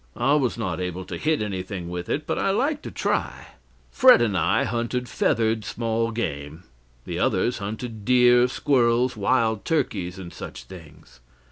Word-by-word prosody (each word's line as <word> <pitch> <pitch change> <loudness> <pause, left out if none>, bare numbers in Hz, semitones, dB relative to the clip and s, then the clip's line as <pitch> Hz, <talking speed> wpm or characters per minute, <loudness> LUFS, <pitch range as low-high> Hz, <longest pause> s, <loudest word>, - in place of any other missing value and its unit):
I 135 +4 +2
was 135 -6 +1
not 95 -6 -3
able 90 0 -4
to - - -6
hit 155 -6 +1
anything 95 -3 -5
with 90 0 -5
it, 145 - -1
but - - -2
I - - +1
liked 280 +9 0
to - - -4
try. - - -2 0.4
Fred 255 0 +7
and 110 -5 +1
I 90 - +2
hunted 120 +1 -2
feathered 110 -5 0
small 115 0 -1
game, 80 -8 -5 0.4
the - - -4
others 120 - +1
hunted 110 +2 -6
deer, 125 +1 +5
squirrels, 125 -2 +1
wild 110 0 +1
turkeys, 100 - -1
and 90 -3 -9
such - - -8
things. 80 -8 -14
115 Hz, 160 wpm, -24 LUFS, 95-125 Hz, 0.4 s, Fred